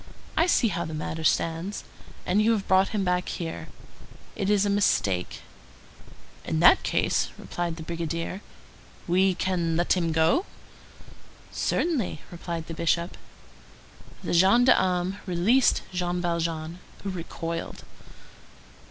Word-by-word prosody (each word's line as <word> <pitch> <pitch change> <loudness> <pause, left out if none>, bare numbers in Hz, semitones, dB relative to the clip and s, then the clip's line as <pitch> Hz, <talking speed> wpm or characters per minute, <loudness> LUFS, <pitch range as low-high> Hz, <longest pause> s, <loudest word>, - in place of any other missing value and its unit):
I 330 - +3
see 245 -9 +3
how 170 -2 -2
the 160 -2 -5
matter 160 +1 -4
stands. 165 +5 0 0.4
And 195 +4 +2
you 225 +2 +4
have 205 -3 -2
brought 190 +1 +4
him 210 -3 -1
back 180 -1 0
here? 165 -2 -5 0.7
It 195 -2 -1
is 205 -1 +3
a - - +1
mistake." 100 - +1 1.0
"In - - -1
that - - +7
case," - - 0
replied 175 -1 -4
the 165 - -8
brigadier, 165 +3 -4 0.7
"we 185 +1 +3
can 170 -4 0
let 175 - +2
him 170 -3 0
go?" 160 - +2 1.0
"Certainly," 260 - -1
replied 170 -1 -5
the 165 - -7
Bishop. 170 +1 0 1.1
The - - -2
gendarmes 190 -1 +4
released 195 +9 +3
Jean 180 0 -1
Valjean, 170 -1 -2 0.2
who 200 - -3
recoiled. 165 -1 -5
175 Hz, 125 wpm, -26 LUFS, 165-195 Hz, 1.1 s, that